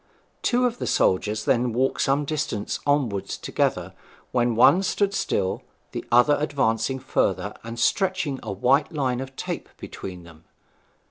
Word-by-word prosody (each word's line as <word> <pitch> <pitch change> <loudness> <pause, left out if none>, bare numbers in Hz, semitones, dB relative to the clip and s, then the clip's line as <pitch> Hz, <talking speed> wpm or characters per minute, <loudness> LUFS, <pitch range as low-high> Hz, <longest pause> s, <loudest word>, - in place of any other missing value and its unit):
Two 250 +1 +2
of 245 -1 -1
the - - -3
soldiers 105 +3 +1
then 120 -1 +2
walked 130 +3 +1
some 140 +2 +2
distance 135 -8 -2
onward 130 -9 +1
together, - - -2 0.4
when 120 -2 +1
one 130 +10 +6
stood 200 +1 0
still, 95 - -1 0.3
the - - -5
other 125 +5 +5
advancing 135 -4 0
further, 130 - -1
and 115 +1 -7
stretching 180 - +1
a 110 - -5
white 125 +9 +2
line 130 -5 -1
of 135 0 -7
tape - - -5
between 90 -2 -8
them. 80 -2 -16
130 Hz, 145 wpm, -24 LUFS, 110-145 Hz, 0.4 s, one